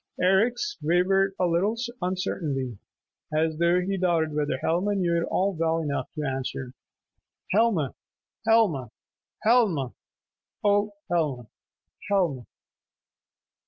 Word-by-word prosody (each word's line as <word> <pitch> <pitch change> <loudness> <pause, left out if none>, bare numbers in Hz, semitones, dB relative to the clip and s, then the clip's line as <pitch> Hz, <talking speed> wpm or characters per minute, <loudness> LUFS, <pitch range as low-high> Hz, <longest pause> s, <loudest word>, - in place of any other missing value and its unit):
Eric's 235 - +2
wavered 190 +4 +2
a 185 - +3
little 180 +6 +1 0.2
uncertainly, 150 - -2 0.5
as 155 +1 0
though 170 +1 +3
he 195 +2 -2
doubted 165 -4 +1
whether 150 -3 0
Helma 180 +8 0
knew 175 -3 +1
it - - -2
well 165 -4 +1
enough 145 -3 -2
to 155 - -3
answer. 130 -1 -4 0.8
"Helma, 200 - +2 0.5
Helma, 195 - +3 0.5
Helma! 205 - +3 0.7
Ohh 205 0 +3 0.2
Helma! 150 -8 0 0.6
Helmaa 180 -9 +2
a!" - - -17
175 Hz, 105 wpm, -26 LUFS, 150-195 Hz, 0.8 s, a